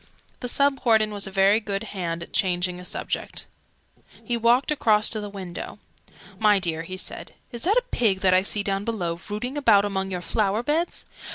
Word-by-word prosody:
The 250 - -4
Sub 280 +2 +2
Warden 220 -3 +3
was 200 -1 -1
a - - -7
very 195 +2 +4
good 200 -2 -3
hand 170 -3 -3
at - - -13
changing 180 -2 0
a - - -9
subject. 180 - -4 0.8
He 240 - -1
walked 235 +5 +3
across 215 -7 +3
to 215 - -1
the 205 - -6
window. 190 -4 -7 0.6
"My 210 -2 +5
dear," 170 -4 -1
he 185 +3 -7
said, - - -5 0.2
"is 240 +3 -5
that 410 +6 +3
a - - +3
pig 200 -6 +1
that 185 -1 +4
I 185 - +5
see 205 +1 0
down 195 0 -1
below, 175 -7 -2
rooting 245 +7 -3
about 205 -7 +5
among 190 -1 -2
your 180 -2 -4
flower 210 +4 0
beds?" 315 +6 -1
205 Hz, 195 wpm, -24 LUFS, 185-230 Hz, 0.8 s, My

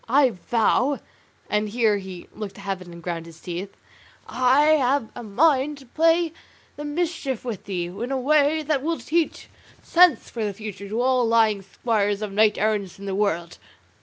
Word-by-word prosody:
I 265 0 +5
vow" 240 +7 +1 0.5
(and 210 0 0
here 220 -2 +2
he 190 -2 -9
looked 205 -3 -7
to - - -11
heaven 190 -3 -5
and 170 0 -11
ground 170 -1 -4
his 165 -1 -13
teeth) 180 +3 -6 0.5
"I 260 +4 +3
have 275 -5 +2
a - - -8
mind 275 +6 +2
to 275 - -14
play 330 +4 +2 0.4
the 295 - -7
mischief 295 -5 -2
with 225 -6 -5
thee, 180 -3 -2
in 200 +9 -5
a 270 - 0
way 300 +3 +3
that 295 -2 0
will 325 +3 -1
teach 330 +1 -1 0.4
sense 355 -1 +4
for 230 - -4
the 205 -2 -2
future 200 -2 -7
to 220 +3 -2
all 255 -2 +2
lying 220 -3 +3
squires 205 +1 -1
of 210 - -4
knights 210 +1 +3
errant 205 -3 -1
in 200 - -10
the 195 - -3
world." 175 -4 -1
225 Hz, 180 wpm, -24 LUFS, 200-285 Hz, 0.5 s, I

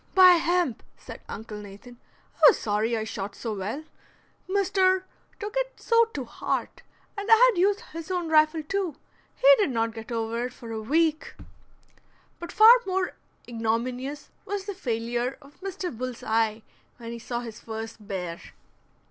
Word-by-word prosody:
"By 370 -1 +9
hemp!" 345 -7 0 0.2
said - - -11
Uncle 215 -1 -7
Nathan, 205 +5 -12 0.4
"I - - -28
was 485 - +6
sorry 220 +2 0
I 220 - -2
shot 205 -2 -5
so 225 -3 -4
well, 210 +9 -4 0.7
Mr. 375 -1 +2 0.4
took 415 +1 -5
it - - -2
so 465 0 +4
to 290 - -6
heart; - - -3 0.3
and 405 0 -5
I - - +11 0.2
had 380 - -3
used 405 +2 +2
his 330 +1 -7
own 355 -2 -1
rifle, 310 0 +3
too. 370 -1 -2 0.4
He - - +1
did 405 - +2
not 230 -2 -1
get 225 +1 -9
over 230 +1 -2
it - - -13
for 230 -2 -10
a 220 -1 -4
week." 315 +6 0 1.0
But 345 - -7
far 450 +4 +8
more 375 0 -1 0.3
ignominious 245 +5 -3
was 400 -1 -4
the 405 - -4
failure 240 -5 -2
of 285 +4 -19
Mr. 375 -6 -5
Bull's 250 +1 -5
Eye 220 0 0 0.3
when 230 -1 -8
he 235 - -6
saw 240 +1 -4
his 230 -2 -8
first 220 -1 -8
bear. 180 -4 -4
255 Hz, 165 wpm, -26 LUFS, 225-370 Hz, 1.0 s, I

